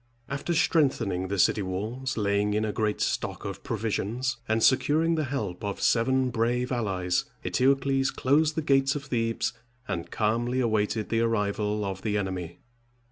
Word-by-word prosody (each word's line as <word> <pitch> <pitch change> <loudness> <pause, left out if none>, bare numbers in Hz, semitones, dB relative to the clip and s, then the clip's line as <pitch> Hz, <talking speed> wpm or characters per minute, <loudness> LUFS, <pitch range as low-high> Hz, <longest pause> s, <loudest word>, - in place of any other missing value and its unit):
After 140 +5 -2
strengthening 115 - +2
the 100 +1 -2
city 105 - +3
walls, 110 +8 -3
laying 105 0 +1
in 110 +1 +1
a 105 - -1
great 105 -1 -1
stock - - -2
of - - -5
provisions, 115 +4 -2
and 110 0 +2
securing 155 +5 +3
the 155 -2 0
help 105 -10 -4
of 100 -1 -3
seven 130 +2 +2
brave 120 +2 0
allies, 95 -7 0 0.2
Eteocles 135 0 +2
closed 150 +4 +2
the 160 - -1
gates 135 -1 +3
of 145 -1 -5
Thebes, 115 -3 -1 0.3
and 85 -4 -3
calmly 120 +4 0
awaited 110 -2 0
the 115 0 +1
arrival 105 -2 0
of 95 -1 -4
the 105 -1 0
enemy. 95 -4 -4
115 Hz, 155 wpm, -27 LUFS, 105-130 Hz, 0.3 s, city